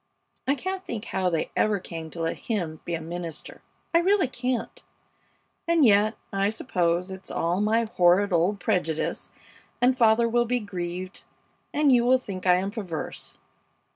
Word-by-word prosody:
I 275 - +3
can't 375 +4 -4
think 230 - -5
how 185 -1 0
they 165 -2 -2
ever 210 -2 +2
came 165 -3 -7
to 165 - -7
let 165 0 -1
him 170 -8 -2
be 170 - -2
a 165 - -5
minister 165 -1 -7 0.3
I 335 - +6
really 375 -2 +3
can't! 255 - -3 0.8
And 335 -4 +4
yet, 215 0 +4 0.2
I 195 +1 +2
suppose 180 -5 -1
it's 190 0 -9
all 175 +4 0
my 220 +2 +2
horrid 190 -2 +3
old 180 +5 +2
prejudice, 175 -6 -1 0.5
and 250 +1 +4
father 230 -1 +4
will 240 +1 +2
be 245 +1 0
grieved 185 -2 -6 0.5
and 295 -1 +3
you 245 -2 +5
will 255 +2 +5
think 190 -7 -6
I 180 - +7
am 190 +2 -1
perverse. 185 -8 -6
200 Hz, 165 wpm, -26 LUFS, 175-240 Hz, 0.8 s, I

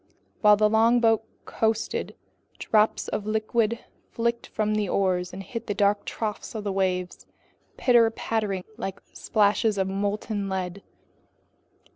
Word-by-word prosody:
While 210 -1 +7
the 215 0 +4
longboat 225 0 +4 0.2
coasted, 220 0 -1 0.4
drops 215 0 +2
of 210 - -3
liquid 220 +1 0 0.2
flicked 235 0 -1
from 215 0 -1
the 210 -3 0
oars 180 -2 0
and 195 +1 -7
hit 230 +4 -7
the 205 - -2
dark 205 0 +2
troughs 215 0 -4
of 215 - -4
the 205 - -2
waves, 185 -2 -2 0.5
pitter 235 -3 +5
pattering 215 -4 -2
like 195 -4 -5
splashes 210 0 +2
of 190 -1 +1
molten 200 +1 -2
lead. 190 0 -3
210 Hz, 130 wpm, -26 LUFS, 195-225 Hz, 0.5 s, While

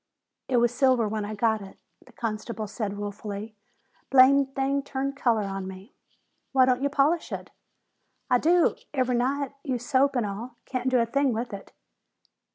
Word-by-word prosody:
"It 255 - +1
was 240 0 +3
silver 255 -4 +3
when 210 0 -2
I 215 +1 -5
got 220 0 +1
it," 195 -1 -11 0.3
the - - -19
constable 220 -1 -4
said 205 -1 -4
ruefully. 205 +1 -6 0.5
"Blame 275 +1 +6
thing 270 +1 -1
turned 275 0 -3
color 235 -6 +1
on 195 -1 -4
me." 190 +5 -10 0.6
"Why 260 -1 +6
don't 255 0 +2
you 280 - +1
polish 295 +4 +1
it?" - - -6 0.8
"I 250 -2 +3
do 345 +4 +3 0.2
ever' 255 -2 +1
night. 270 +3 0
Use 250 -4 -3
soap 275 +1 +2
and 240 -3 +1
all. 225 +5 -6
Can't 255 -1 -2
do 255 - +3
a 230 - +3
thing 275 +2 +1
with 230 0 -4
it." 200 - -8
245 Hz, 170 wpm, -26 LUFS, 215-270 Hz, 0.8 s, Blame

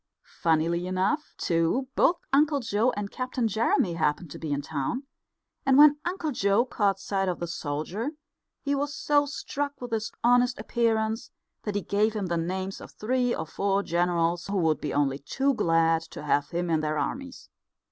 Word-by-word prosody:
Funnily 170 +2 +2
enough, 190 +12 -1
too, 165 +10 +1
both 350 - +4 0.2
Uncle 290 +1 +4
Joe 230 -1 +1
and 205 -1 -3
Captain 255 -2 -1
Jeremy 215 -4 +1
happened 160 -1 -1
to - - -8
be 155 -2 -4
in 145 0 -1
town; 155 - -3 0.6
and 270 -1 +4
when 295 0 +8
Uncle 350 -4 -2
Joe 200 -1 +2
caught 200 -6 0
sight 195 -1 -1
of 180 - -3
the 175 - -2
soldier 170 - -3 0.5
he 285 - 0
was 285 +1 -1
so 290 -1 +2
struck 285 0 -4
with 245 -1 -7
his 220 -1 -2
honest 245 +1 +4
appearance 220 0 0 0.4
that 210 -2 -2
he 205 - +1
gave 210 +2 +1
him 205 -2 -1
the 170 -1 -1
names 185 +3 -3
of - - -10
three 245 +2 0
or 160 - -4
four 200 +4 0
generals 170 -1 0
who 200 0 -1
would 160 -4 +1
be - - -2
only 140 -1 +1
too 270 - 0
glad 165 -5 +3
to - - -8
have 145 0 +1
him 175 0 -2
in 160 - +3
their 155 0 -1
armies. 265 - -4
200 Hz, 180 wpm, -27 LUFS, 170-250 Hz, 0.6 s, when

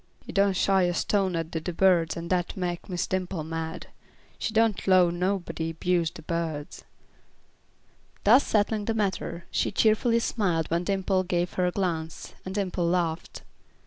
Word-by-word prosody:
"He - - -7
done 200 0 +3
shy 190 +1 +3
a 175 0 0
stone 195 -2 +1
at 165 -1 -3
the 160 - -3
de 180 - -3
birds 175 -2 +3
and 170 0 -5
dat 180 +1 -1
mek 175 0 -3
Miss 180 -2 -1
Dimple 185 -3 -2
mad. 160 +1 -5 0.5
She - - -2
don't 220 -2 +1
'low 185 -2 +5
nobody 175 -2 -2
'buse 170 0 +1
de - - -12
birds." 160 -3 -4 1.4
Thus 240 +7 +6
settling 210 0 +1
the 225 - -1
matter, 190 -5 -2
she - - 0
cheerfully 225 +2 +3
smiled 180 -9 0
when 170 +1 0
Dimple 190 -1 +1
gave 175 -1 -1
her 180 -1 +1
a - - 0
glance, 165 -4 -3
and 190 +1 -6
Dimple 185 -4 -1
laughed. 170 -2 -1
180 Hz, 165 wpm, -27 LUFS, 170-195 Hz, 1.4 s, Thus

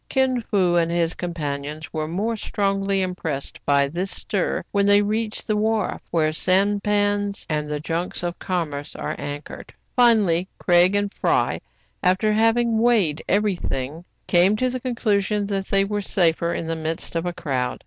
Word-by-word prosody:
Kin 260 -2 +1
Fo 185 -5 +1
and 165 -1 +2
his 170 -1 +1
companions 150 -3 -5
were 155 -1 -2
more 205 +8 -1
strongly 195 -2 0
impressed 165 -6 -4
by 140 -1 +4
this 175 +7 -3
stir 195 -1 -2
when 200 0 +2
they 205 0 +6
reached 215 +1 -2
the 215 - 0
wharf, 220 +1 0
where 155 -2 +1
sampans 205 +2 +1
and 150 -1 -2
the 150 0 -2
junks 165 +4 -3
of 175 0 -3
com 175 -5 -2
merce 145 0 -7
are - - -4
anchored. 145 +1 -7 0.2
Finally 205 -8 +4
Craig 175 +2 +4
and 205 0 0
Fry, - - +1 0.4
after 190 +4 +2
having 225 +1 +2
weighed 215 -10 +2
every 205 0 +2
thing, 145 0 -4 0.2
came 180 +4 +4
to 255 +3 0
the 255 - -3
conclusion 210 -5 0
that 195 -1 -2
they 195 0 +3
were 205 +1 -2
safer 170 -3 +1
in 170 - -3
the 165 0 -2
midst 160 +1 -3
of 165 +1 -1
a - - 0
crowd. 135 -8 -2
190 Hz, 170 wpm, -23 LUFS, 165-210 Hz, 0.4 s, they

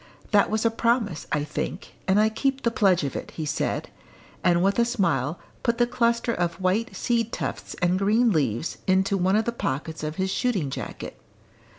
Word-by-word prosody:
"That 205 -2 +4
was 220 +1 0
a 230 - +4
promise, 225 -8 0
I 150 - +1
think, 150 - -5
and 190 +2 +4
I 215 +1 +4
keep 270 +4 -1
the 235 - +2
pledge 190 -7 +3
of 140 - -3
it," - - -5
he 160 - -2
said, 145 - -2 0.5
and 175 0 +3
with 195 +4 +2
a - - +6
smile 170 - 0 0.2
put 235 -1 +1
the 240 - +4
cluster 235 -1 +1
of 175 -3 -1
white 195 +6 0
seed 230 -2 0
tufts - - -4
and 180 +1 +3
green 220 +4 +3
leaves 140 - -1
into 190 +1 +3
one 190 +1 +2
of 220 +1 +2
the 235 - 0
pockets 160 - -3
of 155 0 -3
his 190 +1 -1
shooting 195 - 0
jacket. - - -6
195 Hz, 195 wpm, -25 LUFS, 170-230 Hz, 0.5 s, a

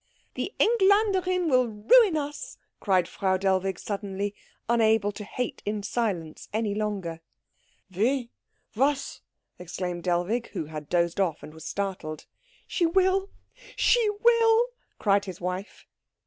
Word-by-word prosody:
"The - - -3
Engländerin 385 -5 +3
will 255 -4 +3
ruin 315 - +4
us!" 290 -1 -5 0.2
cried 185 -4 +2
Frau 190 -1 0
Dellwig 190 -1 0
suddenly, 200 0 -4 0.3
unable 220 -3 +3
to 210 +1 -8
hate 245 +3 -4
in 205 0 -3
silence 190 -10 -3
any 215 -1 -1
longer. 200 -6 -3 0.7
"Wie? 240 +4 +1 0.4
Was?" 275 +4 0 0.4
exclaimed 180 0 -4
Dellwig, 180 +7 0
who - - -3
had 150 -1 -8
dozed 170 +1 +1
off, 180 -5 0
and 155 - -10
was 160 0 -11
startled. 185 -6 -4 0.4
"She 345 - +1
will 380 +2 +2 0.5
she 470 -3 +3
will!" 465 0 +5 0.3
cried 200 -1 +2
his 185 -3 -7
wife. 180 +3 -5
210 Hz, 125 wpm, -27 LUFS, 185-295 Hz, 0.7 s, will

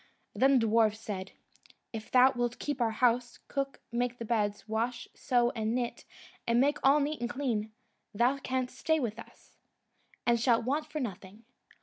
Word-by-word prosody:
Then 265 +6 +4
the 230 - +2
dwarfs 220 -1 +3
said, 195 -4 -5 0.6
"If 220 -1 -6
thou 255 +1 +6
wilt 245 -1 -2
keep 290 -3 -3
our 230 - +3
house, 240 +1 +1
cook, 275 -1 -3
make 245 +1 -1
the 230 - -6
beds, 210 -2 -1
wash, 230 +2 -2
sew 240 -1 +1
and 220 -1 -1
knit, 245 -1 -3 0.4
and 235 0 +3
make 285 +3 +2
all 275 +2 +5
neat 295 0 -2
and 240 - -1
clean, 230 -6 -2 0.4
thou 245 +6 +2
canst 255 -1 -3
stay 320 0 +2
with 235 -4 -3
us, - - -15 0.7
and 235 -1 +3
shalt 230 -1 +3
want 295 +5 0
for 305 0 -4
nothing." 205 -3 -6
240 Hz, 175 wpm, -30 LUFS, 225-260 Hz, 0.7 s, thou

